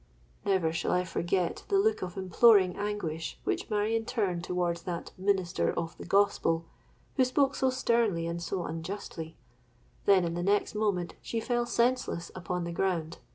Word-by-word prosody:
'—Never 185 -5 +2
shall 165 - -1
I 180 0 +2
forget 175 0 -1
the 395 - +3
look 435 +2 +2
of 180 +1 -5
imploring 190 0 +5
anguish 190 -6 -3
which - - -2
Marion 220 +1 +1
turned 200 -8 -1
towards 175 -1 -1
that 170 -1 -5
minister 185 -2 +1
of 165 -1 -3
the - - -7
Gospel, 175 -4 +2 0.5
who 260 - +6
spoke 270 +2 +2
so 265 - +1
sternly 230 -9 +1
and 170 0 -3
so 175 +1 -2
unjustly; 165 -1 -6 0.7
then, 190 -3 +5
in 170 - -2
the 175 - -2
next 200 +3 +1
moment, 205 -5 0
she 230 - -3
fell 240 +1 0
senseless 240 -9 0
upon 180 -1 -3
the 170 - -4
ground. 170 -2 -1
185 Hz, 160 wpm, -30 LUFS, 170-215 Hz, 0.7 s, who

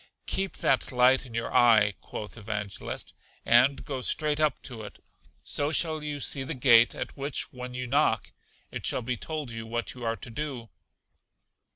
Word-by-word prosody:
Keep 195 0 0
that 135 - +1
light 130 +1 +4
in 115 - -10
your 115 0 -3
eye, 110 -4 +5
quoth 105 - -8
Evangelist, 105 -2 -5 0.3
and 125 +4 +4
go 135 -3 -4
straight 150 +3 +1
up 155 -3 +2
to 120 -3 -5
it; 105 - -10 0.5
so 145 +1 0
shall 160 -2 0
you 150 -1 -4
see 140 0 0
the 135 - -3
gate, 120 -2 +5
at - - -5
which, 140 0 -2
when 125 0 -7
you 125 0 -3
knock, 140 +5 +1 0.4
it - - -6
shall 125 - 0
be 125 +2 -2
told 150 +1 -5
you 115 0 -7
what 120 +1 -3
you 125 - -10
are 115 0 0
to 115 - -10
do. 125 -3 -5
125 Hz, 180 wpm, -28 LUFS, 115-145 Hz, 0.5 s, eye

